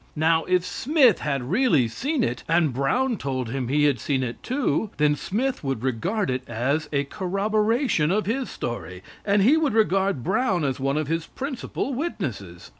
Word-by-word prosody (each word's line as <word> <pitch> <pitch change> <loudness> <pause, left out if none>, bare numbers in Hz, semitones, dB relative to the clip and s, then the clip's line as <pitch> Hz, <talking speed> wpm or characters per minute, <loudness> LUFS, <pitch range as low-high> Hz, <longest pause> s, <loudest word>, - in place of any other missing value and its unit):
Now, 160 +1 +2
if 180 -1 +1
Smith 255 - +3
had 140 -4 -2
really 190 - +3
seen 275 - -1
it, 120 +1 -2
and 165 -4 +3
Brown 230 - +1
told 130 -5 -3
him 130 -2 -2
he 145 +3 +2
had 145 -5 +3
seen 135 +2 -1
it 120 -1 -5
too, 255 -4 -1
then 150 0 +3
Smith 225 - -2
would 135 -4 -2
regard 155 - -1
it 125 0 -2
as 140 +7 -1
a 140 -1 +1
corroboration 210 - 0
of 210 +4 +1
his 255 +4 -2
story, 95 -6 -6 0.2
and 200 -1 +3
he 275 +9 +5
would 300 -8 +1
regard 195 - +2
Brown 190 - +1
as 135 -1 -1
one 135 +2 0
of 155 - 0
his 165 +1 -2
principal 270 0 -4
witnesses. 130 - -4
165 Hz, 180 wpm, -24 LUFS, 135-225 Hz, 0.2 s, he